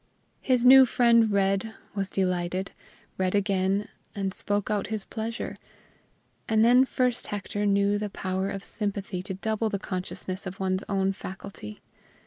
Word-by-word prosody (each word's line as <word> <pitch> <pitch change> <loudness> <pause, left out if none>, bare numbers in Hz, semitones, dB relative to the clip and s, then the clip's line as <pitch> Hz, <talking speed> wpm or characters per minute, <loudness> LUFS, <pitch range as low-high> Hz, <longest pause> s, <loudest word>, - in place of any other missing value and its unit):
His 250 -2 +2
new 265 +1 +9
friend 235 -3 +4
read, 195 +2 +1 0.2
was 195 -1 -2
delighted; 185 0 -1 0.5
read 185 +1 +1
again, 195 0 +1 0.3
and 195 -2 -2
spoke 205 +1 -2
out 205 -2 0
his 215 -3 -2
pleasure; 225 +1 -5 0.9
and 220 0 +4
then 250 +2 +6
first 250 -2 0
Hector 205 0 -3
knew 200 +1 +2
the 210 0 -3
power 190 0 -2
of 195 -1 -5
sympathy 200 -3 -3
to 190 0 -5
double 220 +3 -1
the 200 - -1
consciousness 185 0 -5
of 185 +1 -7
one's 185 0 0
own 195 -1 +1
faculty. 190 - -9
200 Hz, 145 wpm, -27 LUFS, 190-220 Hz, 0.9 s, new